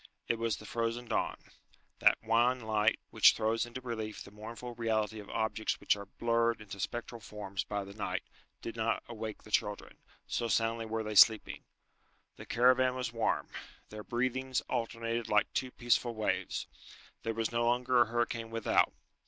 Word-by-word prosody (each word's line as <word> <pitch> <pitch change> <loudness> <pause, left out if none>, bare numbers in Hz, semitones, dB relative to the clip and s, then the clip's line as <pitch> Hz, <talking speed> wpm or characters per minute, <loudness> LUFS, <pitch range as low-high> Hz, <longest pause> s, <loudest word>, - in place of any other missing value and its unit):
It 115 - 0
was 115 -1 0
the - - -11
frozen 115 +1 -2
dawn. - - -1 0.6
That - - +6
wan 120 +3 +3
light 110 -1 +2
which - - +7
throws 115 +1 0
into 120 +2 -7
relief 110 -4 -5
the 100 - -13
mournful 115 +3 -8
reality 110 -2 -1
of 100 - -10
objects 110 0 -1
which - - +3
are 100 -1 -8
blurred 115 +2 +1
into 100 -2 -9
spectral 120 +3 -4
forms 100 -3 -5
by 100 -1 -3
the 100 0 -10
night, 105 - -3 0.4
did 115 - -5
not 115 0 0
awake 110 -2 -6
the 105 - -14
children, 105 -1 -1 0.3
so 120 - -1
soundly 115 +1 +1
were 110 0 -2
they 110 0 -4
sleeping. 110 +1 +5 0.7
The - - -10
caravan 125 +1 +4
was 125 -2 -3
warm. 115 -1 0 0.4
Their 105 0 -8
breathings 130 +2 -1
alternated 115 -1 -2
like 105 -1 +3
two 130 - -1
peaceful 120 -1 +1
waves. 110 -1 -1 0.6
There 115 -1 -2
was 115 0 -1
no 120 0 +1
longer 125 +1 +3
a - - +6
hurricane 115 0 -1
without. 115 -1 +2
115 Hz, 170 wpm, -32 LUFS, 110-120 Hz, 0.7 s, which